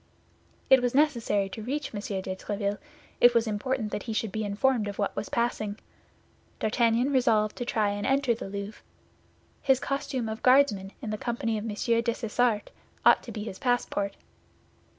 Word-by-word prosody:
It 265 Hz, -1 st, +8 dB
was 245 Hz, 0 st, 0 dB
necessary 235 Hz, -9 st, +2 dB
to 220 Hz, -, -7 dB
reach 275 Hz, +5 st, -3 dB
M. 205 Hz, -, -3 dB
de 190 Hz, -2 st, -4 dB
Tréville; 200 Hz, +1 st, -3 dB, 0.4 s
it 240 Hz, 0 st, +6 dB
was 230 Hz, 0 st, +4 dB
important 220 Hz, +1 st, -2 dB
that -, -, -3 dB
he -, -, -1 dB
should 220 Hz, -1 st, -1 dB
be 220 Hz, +2 st, -2 dB
informed 215 Hz, +2 st, +1 dB
of 200 Hz, -, -5 dB
what 200 Hz, -, -1 dB
was -, -, -4 dB
passing. 215 Hz, -3 st, -1 dB, 0.8 s
D'Artagnan 235 Hz, +4 st, +2 dB
resolved 220 Hz, -5 st, +3 dB
to 245 Hz, -, -3 dB
try 215 Hz, -3 st, +1 dB
and 205 Hz, 0 st, -3 dB
enter 270 Hz, -2 st, +2 dB
the 220 Hz, -3 st, -7 dB
Louvre. 200 Hz, +2 st, -6 dB, 0.8 s
His 265 Hz, -1 st, +3 dB
costume 265 Hz, -4 st, -2 dB
of 220 Hz, 0 st, -5 dB
Guardsman 250 Hz, -8 st, +4 dB
in 215 Hz, -, -3 dB
the 215 Hz, -, -3 dB
company 230 Hz, -2 st, -2 dB
of 210 Hz, -, -6 dB
M. 215 Hz, -2 st, -3 dB, 0.3 s
Dessessart 230 Hz, -1 st, 0 dB, 0.3 s
ought -, -, +7 dB
to -, -, -9 dB
be 210 Hz, -, -5 dB
his 195 Hz, -3 st, -7 dB
passport. 245 Hz, -6 st, -1 dB
225 Hz, 170 wpm, -28 LUFS, 205-245 Hz, 0.8 s, It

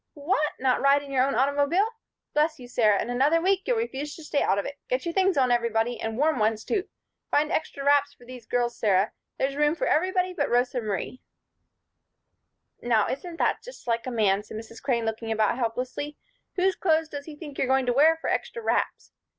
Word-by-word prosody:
"What! 300 Hz, 0 st, 0 dB
Not 255 Hz, -1 st, +1 dB
ride 280 Hz, +1 st, +4 dB
in 280 Hz, -, -10 dB
your 260 Hz, -2 st, +3 dB
own 275 Hz, -, -1 dB
automobile? 285 Hz, -, +2 dB, 0.5 s
Bless 305 Hz, +1 st, +2 dB
you, 245 Hz, -, -10 dB
Sarah, 215 Hz, -5 st, +3 dB
in 240 Hz, -, -2 dB
another 280 Hz, +7 st, +3 dB
week 380 Hz, +2 st, +2 dB
you'll -, -, +2 dB
refuse 295 Hz, -, -3 dB
to 320 Hz, -, -11 dB
stay 295 Hz, -1 st, 0 dB
out 195 Hz, -, +2 dB
of 200 Hz, -, -1 dB
it. 285 Hz, -, -7 dB
Get 255 Hz, +5 st, -1 dB
your 340 Hz, -, -2 dB
things 380 Hz, -2 st, +2 dB
on, 255 Hz, -2 st, +3 dB
everybody; 235 Hz, 0 st, 0 dB
and 225 Hz, 0 st, -3 dB
warm 300 Hz, -1 st, +2 dB
ones, 215 Hz, 0 st, +1 dB
too. 395 Hz, -3 st, -2 dB, 0.4 s
Find 300 Hz, +2 st, +2 dB
extra 280 Hz, -3 st, -2 dB
wraps 285 Hz, 0 st, +4 dB
for 245 Hz, -, -18 dB
these 245 Hz, -2 st, -11 dB
girls, 240 Hz, -1 st, 0 dB
Sarah. 200 Hz, -2 st, +2 dB, 0.3 s
There's 275 Hz, +1 st, -1 dB
room 295 Hz, +2 st, +2 dB
for -, -, -2 dB
everybody 365 Hz, +2 st, +1 dB
but -, -, -1 dB
Rosa 245 Hz, +1 st, +1 dB
Marie." 215 Hz, +4 st, -4 dB, 1.6 s
"Now, 225 Hz, -3 st, +2 dB
isn't 335 Hz, +5 st, -5 dB
that -, -, +1 dB
just -, -, -12 dB
like 230 Hz, 0 st, -1 dB
a -, -, -2 dB
man?" 205 Hz, -4 st, +2 dB
said 215 Hz, +1 st, -9 dB
Mrs. 225 Hz, +1 st, -10 dB
Crane, 240 Hz, -4 st, 0 dB
looking 225 Hz, 0 st, -3 dB
about 220 Hz, +3 st, +1 dB
helplessly. 255 Hz, +5 st, -3 dB, 0.4 s
"Whose 380 Hz, 0 st, +2 dB
clothes 320 Hz, -3 st, +1 dB
does 285 Hz, -1 st, -7 dB
he 310 Hz, -, -9 dB
think 295 Hz, -2 st, -9 dB
you're 265 Hz, -, +1 dB
going 265 Hz, 0 st, +2 dB
to 245 Hz, -, +1 dB
wear 315 Hz, +5 st, +5 dB
for -, -, -5 dB
'extra 465 Hz, -, -2 dB
wraps'? -, -, -1 dB
270 Hz, 210 wpm, -26 LUFS, 235-310 Hz, 1.6 s, wear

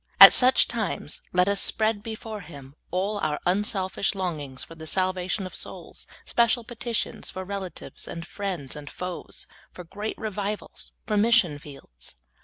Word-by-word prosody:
At -, -, +13 dB
such 255 Hz, 0 st, +6 dB
times, 210 Hz, -9 st, -3 dB
let 180 Hz, +1 st, +4 dB
us 200 Hz, -1 st, +2 dB
spread 220 Hz, -1 st, +1 dB
before 220 Hz, -1 st, -6 dB
Him 140 Hz, -5 st, -11 dB, 0.2 s
all 195 Hz, +4 st, 0 dB
our 150 Hz, -6 st, 0 dB
unselfish 195 Hz, +1 st, +1 dB
longings 150 Hz, -8 st, -3 dB
for -, -, -10 dB
the 160 Hz, -1 st, -9 dB
salvation 185 Hz, +2 st, 0 dB
of 185 Hz, -, -7 dB
souls, -, -, -5 dB, 0.2 s
special 235 Hz, 0 st, +3 dB
petitions 235 Hz, -1 st, -2 dB
for 185 Hz, 0 st, -5 dB
relatives 190 Hz, -3 st, -6 dB
and 165 Hz, 0 st, -6 dB
friends 180 Hz, -10 st, -4 dB
and 150 Hz, -1 st, -8 dB
foes, 180 Hz, -1 st, -5 dB, 0.3 s
for 180 Hz, -, -9 dB
great 205 Hz, +5 st, -5 dB
Revivals, 210 Hz, -1 st, -4 dB
for 210 Hz, -, 0 dB
mission 205 Hz, -9 st, +4 dB
fields. 135 Hz, -, -12 dB
190 Hz, 150 wpm, -26 LUFS, 165-215 Hz, 0.3 s, At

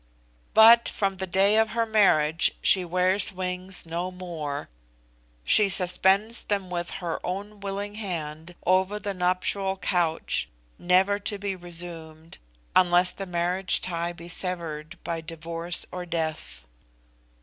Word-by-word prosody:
But, 230 Hz, +2 st, +7 dB
from 195 Hz, -2 st, -2 dB
the 190 Hz, 0 st, -4 dB
day 195 Hz, +4 st, +3 dB
of 220 Hz, 0 st, +3 dB
her 230 Hz, -, +2 dB
marriage 165 Hz, -8 st, +3 dB
she 185 Hz, -, +5 dB
wears 185 Hz, +3 st, +3 dB
wings 185 Hz, 0 st, -3 dB
no 170 Hz, +2 st, -3 dB
more, 170 Hz, -6 st, -6 dB, 0.8 s
she 200 Hz, -, +5 dB
suspends 190 Hz, +4 st, +2 dB
them 195 Hz, -3 st, -2 dB
with 175 Hz, -1 st, -3 dB, 0.2 s
her 165 Hz, -, -4 dB
own 200 Hz, +3 st, -5 dB
willing 200 Hz, +1 st, -5 dB
hand 170 Hz, -5 st, -6 dB
over 190 Hz, +3 st, +2 dB
the 205 Hz, -1 st, -4 dB
nuptial 185 Hz, +2 st, -1 dB
couch, 175 Hz, -3 st, 0 dB, 0.3 s
never 185 Hz, +3 st, +2 dB
to 205 Hz, 0 st, -2 dB
be 200 Hz, -1 st, -4 dB
resumed 165 Hz, -2 st, -9 dB, 0.4 s
unless 180 Hz, 0 st, +4 dB
the 195 Hz, -, -7 dB
marriage 180 Hz, +1 st, 0 dB
tie 170 Hz, -1 st, -2 dB
be 170 Hz, 0 st, -11 dB
severed 165 Hz, -4 st, -3 dB
by 165 Hz, -1 st, -3 dB
divorce 165 Hz, +1 st, -3 dB
or 180 Hz, -1 st, -6 dB
death. 160 Hz, -, -4 dB
180 Hz, 130 wpm, -25 LUFS, 170-195 Hz, 0.8 s, But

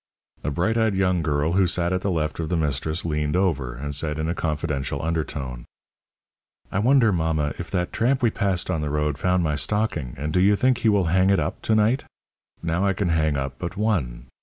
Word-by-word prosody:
A 75 Hz, -, -1 dB
bright 95 Hz, +11 st, 0 dB
eyed 110 Hz, -3 st, +2 dB
young 90 Hz, -2 st, +2 dB
girl 75 Hz, 0 st, 0 dB
who 95 Hz, +1 st, +3 dB
sat 85 Hz, 0 st, 0 dB
at 90 Hz, -, 0 dB
the 100 Hz, -, -1 dB
left 80 Hz, -3 st, -1 dB
of 80 Hz, -, -2 dB
the 90 Hz, -, +1 dB
mistress 80 Hz, +2 st, -1 dB
leaned 75 Hz, -1 st, -1 dB
over, 75 Hz, -10 st, 0 dB
and 70 Hz, +3 st, -5 dB
said 75 Hz, +1 st, -1 dB
in 80 Hz, 0 st, -2 dB
a 85 Hz, -, 0 dB
confidential 75 Hz, -4 st, -2 dB
undertone: 75 Hz, -6 st, -3 dB, 1.1 s
"I 95 Hz, -, 0 dB
wonder, 120 Hz, 0 st, +4 dB
mamma, 80 Hz, -4 st, 0 dB
if 85 Hz, -, -5 dB
that 90 Hz, -2 st, -2 dB
tramp 125 Hz, +2 st, +1 dB
we 115 Hz, -, +4 dB
passed 95 Hz, -3 st, -1 dB
on 80 Hz, -4 st, -1 dB
the 75 Hz, -, -2 dB
road 75 Hz, -1 st, -1 dB
found 90 Hz, -1 st, +2 dB
my 75 Hz, -2 st, 0 dB
stocking, 75 Hz, -, -1 dB
and 75 Hz, +3 st, -3 dB
do 90 Hz, -, +3 dB
you 100 Hz, +2 st, +5 dB
think 130 Hz, +3 st, +2 dB
he 115 Hz, -, +3 dB
will 100 Hz, -3 st, +3 dB
hang 95 Hz, +1 st, +4 dB
it 100 Hz, -, +4 dB
up -, -, -3 dB
to 110 Hz, -, +1 dB
night? 110 Hz, +5 st, +2 dB, 0.6 s
Now 85 Hz, +2 st, 0 dB
I 100 Hz, -1 st, +2 dB
can 95 Hz, -1 st, -1 dB
hang 80 Hz, -3 st, +1 dB
up 65 Hz, 0 st, -4 dB
but 90 Hz, +2 st, -5 dB
one. 70 Hz, -, -1 dB
85 Hz, 220 wpm, -24 LUFS, 75-95 Hz, 1.1 s, you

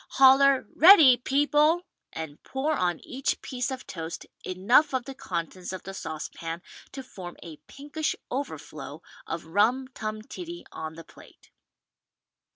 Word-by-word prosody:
Holler 270 Hz, 0 st, +6 dB
"Ready, 320 Hz, -7 st, +9 dB
people!" 295 Hz, +6 st, +2 dB, 0.3 s
and 160 Hz, -2 st, -7 dB
pour 280 Hz, +4 st, -2 dB
on 175 Hz, -, 0 dB
each 265 Hz, +1 st, -2 dB
piece 250 Hz, 0 st, -3 dB
of 260 Hz, -1 st, -6 dB
toast 165 Hz, -2 st, -6 dB, 0.2 s
enough 235 Hz, +11 st, +3 dB
of 250 Hz, -2 st, -1 dB
the 270 Hz, -, -7 dB
contents 180 Hz, -5 st, -5 dB
of 185 Hz, -, -7 dB
the 195 Hz, -, -7 dB
saucepan 165 Hz, 0 st, -6 dB, 0.3 s
to 270 Hz, -, -6 dB
form 180 Hz, -8 st, -10 dB
a 160 Hz, -3 st, -10 dB
pinkish 295 Hz, +3 st, -3 dB, 0.2 s
overflow 270 Hz, +2 st, -6 dB, 0.2 s
of 165 Hz, 0 st, -4 dB
rum 225 Hz, +10 st, +2 dB
tum 215 Hz, -4 st, -5 dB
tiddy 345 Hz, +7 st, -8 dB
on 160 Hz, 0 st, -6 dB
the 165 Hz, -, -10 dB
plate. -, -, -18 dB
250 Hz, 140 wpm, -27 LUFS, 175-275 Hz, 0.3 s, Ready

